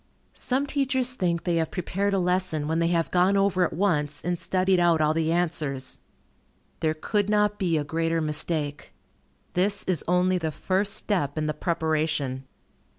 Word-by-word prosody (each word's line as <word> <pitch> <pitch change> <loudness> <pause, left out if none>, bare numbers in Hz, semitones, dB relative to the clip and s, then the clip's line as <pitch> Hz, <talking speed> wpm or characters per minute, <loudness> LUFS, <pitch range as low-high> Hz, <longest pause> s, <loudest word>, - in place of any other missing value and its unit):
Some 265 +3 -1
teachers 260 -3 0
think 175 -7 -1
they 175 -2 0
have 160 -1 0
prepared 195 +2 -1
a - - +2
lesson 180 -4 0
when 160 +1 0
they 170 - +2
have 170 -1 0
gone 185 +2 +3
over 195 -2 +2
it - - -3
once, 150 -6 -1
and 175 0 -1
studied 185 0 +1
out 170 -2 +3
all 155 0 +3
the 160 0 0
answers. 155 -6 -1 0.8
There 155 -1 0
could 205 +6 -1
not 210 0 +2
be 175 -5 +1
a 150 - 0
greater 165 +2 -1
mistake. 150 -1 -2 0.6
This 195 +2 +2
is 180 -5 -1
only 180 +1 +2
the 160 -2 -2
first 190 +6 -1
step 155 -9 -1
in 155 - 0
the 155 - -1
preparation. 155 -5 -1
170 Hz, 170 wpm, -26 LUFS, 155-190 Hz, 0.8 s, gone